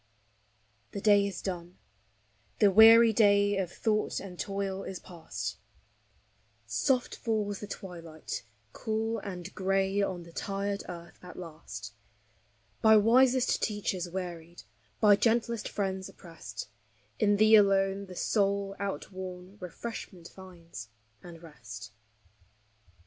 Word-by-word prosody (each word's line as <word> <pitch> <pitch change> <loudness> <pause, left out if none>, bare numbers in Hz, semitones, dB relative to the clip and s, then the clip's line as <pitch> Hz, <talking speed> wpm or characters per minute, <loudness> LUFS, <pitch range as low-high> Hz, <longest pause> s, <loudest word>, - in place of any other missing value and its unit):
The - - -3
day 205 -1 +5
is 195 - -6
done; 175 -2 -5 0.8
the 205 -2 +5
weary 225 +2 +8
day 205 -1 +4
of 180 -3 -2
thought 215 +2 0
and 180 -3 -9
toil 195 -1 -3
is 190 - -6
past, 175 -3 -6 1.1
Soft 255 -3 0
falls 210 -3 -2
the 210 - -7
twilight 170 -6 -7 0.3
cool 225 +1 -2
and 180 -4 -7
gray 195 +1 +1
on 185 -3 -2
the 170 - -14
tired 200 +3 -3
earth 170 -1 -9
at 180 0 -11
last: 135 -12 -8 0.9
By 220 -1 +7
wisest 250 +4 +4
teachers 195 -4 -2
wearied, 175 -2 -6 0.4
by 210 -1 +7
gentlest 230 0 +1
friends 190 -2 -3
oppressed, 160 - -9 0.5
In 205 -1 +3
thee 215 +1 +5
alone, 195 -1 +3
the 185 - -10
soul, 200 0 0
outworn, 190 -1 -6
refreshment 180 -1 -7
finds, 170 - -11 0.3
and 170 -1 -12
rest. 110 -9 -10
195 Hz, 115 wpm, -30 LUFS, 175-210 Hz, 1.1 s, weary